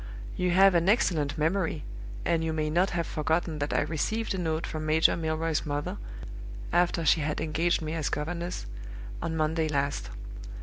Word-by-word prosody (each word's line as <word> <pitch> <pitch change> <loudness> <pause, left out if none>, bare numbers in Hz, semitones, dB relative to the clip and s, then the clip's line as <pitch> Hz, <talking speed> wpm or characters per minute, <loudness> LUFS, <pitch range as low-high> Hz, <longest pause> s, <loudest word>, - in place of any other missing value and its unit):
You 180 - +1
have 190 +2 +6
an 170 +2 +3
excellent 160 -9 +2
memory, 160 -1 0 0.4
and 165 -1 +2
you 160 0 -1
may 155 -1 -1
not 180 +4 +3
have 170 -1 -1
forgotten 160 0 -1
that 145 0 -1
I - - +2
received 220 +9 -1
a 190 - -2
note 160 -2 -1
from 155 0 -4
Major 155 +1 +4
Milroy's 160 -1 -1
mother 145 +6 -3 0.8
(after 175 -1 +2
she 155 +2 +5
had 150 +1 -1
engaged 160 +2 +1
me 155 0 -3
as 160 -3 -1
governess) 170 +4 -3 0.6
on 160 -1 -2
Monday 155 +1 +1
last. 140 -1 -1
160 Hz, 170 wpm, -28 LUFS, 155-175 Hz, 0.8 s, have